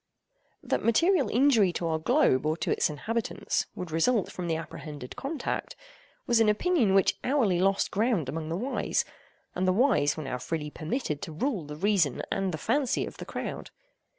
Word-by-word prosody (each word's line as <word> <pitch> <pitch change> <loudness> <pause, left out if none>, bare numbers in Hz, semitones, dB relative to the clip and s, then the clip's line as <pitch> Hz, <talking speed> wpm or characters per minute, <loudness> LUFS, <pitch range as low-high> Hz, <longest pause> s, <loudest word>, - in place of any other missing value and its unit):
That - - -1
material 330 - +3
injury 235 -6 +4
to 170 - -3
our 160 -1 0
globe 240 - +3
or 155 +1 0
to - - -2
its - - +2
inhabitants 220 +10 -2
would 180 -3 -6
result 195 +6 +1
from 180 -1 -5
the 165 - 0
apprehended 150 -4 -7
contact, 290 +3 -4 0.5
was 235 -1 +3
an 225 -1 +5
opinion 225 - +2
which 195 - +3
hourly 240 -10 +2
lost 195 +1 +2
ground 210 - +1
among 155 +3 -4
the 165 - -2
wise; 255 +7 -1 0.5
and 185 +1 -1
the - - +5
wise 190 - +3
were 155 - -4
now 130 -2 -4
freely 150 +1 -4
permitted 155 - -3
to 175 - -6
rule 190 - -2
the 150 0 -7
reason 185 -4 +1
and 195 -1 0
the 160 - -3
fancy 255 - 0
of - - -9
the - - -7
crowd. - - -5
190 Hz, 180 wpm, -28 LUFS, 160-240 Hz, 0.5 s, an